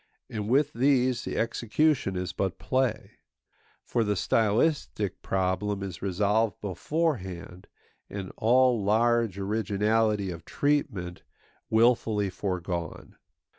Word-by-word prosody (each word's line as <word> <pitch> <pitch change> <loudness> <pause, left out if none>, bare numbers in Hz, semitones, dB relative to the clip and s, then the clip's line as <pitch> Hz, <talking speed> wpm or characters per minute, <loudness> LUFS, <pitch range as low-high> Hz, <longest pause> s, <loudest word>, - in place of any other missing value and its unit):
And 105 -2 -4
with 145 +4 +3
these 130 -1 +2
the - - -3
execution 120 0 +1
is 90 0 -3
but 95 -1 -2
play; 130 -3 -1 0.7
for 120 - 0
the 105 -1 0
stylistic 110 - 0
problem 95 +2 -1
is 95 -4 -6
resolved 105 +3 +1
beforehand, 95 - -3 0.4
and 95 -2 -6
all 125 -1 +3
large 115 0 +2
originality 105 0 0
of 85 -1 -8
treatment 110 - -1 0.5
wilfully 110 -3 +2
foregone. 90 -3 -4
105 Hz, 100 wpm, -27 LUFS, 95-120 Hz, 0.7 s, with